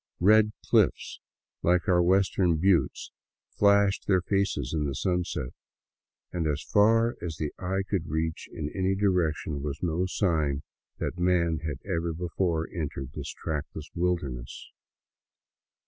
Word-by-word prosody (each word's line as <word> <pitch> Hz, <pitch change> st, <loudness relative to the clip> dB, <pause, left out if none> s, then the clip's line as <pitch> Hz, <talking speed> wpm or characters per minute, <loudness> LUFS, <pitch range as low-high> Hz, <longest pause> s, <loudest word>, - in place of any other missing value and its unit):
Red 105 Hz, +3 st, +5 dB
clififs, -, -, +2 dB, 0.4 s
like 90 Hz, +3 st, +2 dB
our 90 Hz, -2 st, +4 dB
v*^estern 90 Hz, -2 st, +2 dB
hiittes, 95 Hz, 0 st, +1 dB, 0.4 s
flashed 100 Hz, -1 st, +3 dB
their 95 Hz, -3 st, +3 dB
faces 95 Hz, -10 st, 0 dB
in 75 Hz, -2 st, 0 dB
the 70 Hz, -2 st, -2 dB
sunset, 90 Hz, -9 st, -2 dB, 0.8 s
and 85 Hz, -3 st, -1 dB
as 75 Hz, -1 st, -1 dB
far 115 Hz, +3 st, +3 dB
as 80 Hz, -3 st, -5 dB
the 75 Hz, -2 st, -3 dB
eye 95 Hz, +1 st, -1 dB
could 90 Hz, -5 st, -2 dB
reach 80 Hz, +1 st, -2 dB
in 75 Hz, -1 st, -5 dB
any 95 Hz, 0 st, +1 dB
di 100 Hz, +2 st, 0 dB
rection 80 Hz, -6 st, 0 dB
was 75 Hz, +2 st, -5 dB
no 90 Hz, +2 st, 0 dB
sign 80 Hz, -8 st, 0 dB, 0.3 s
that 90 Hz, -, -4 dB
man 85 Hz, -3 st, +2 dB
had 80 Hz, -4 st, -4 dB
ever 85 Hz, -3 st, -1 dB
before 85 Hz, -1 st, -1 dB
entered 70 Hz, -5 st, -4 dB
this 75 Hz, -2 st, -6 dB
trackless 75 Hz, 0 st, -5 dB
wilderness. 80 Hz, -9 st, -3 dB
85 Hz, 135 wpm, -28 LUFS, 80-95 Hz, 0.8 s, Red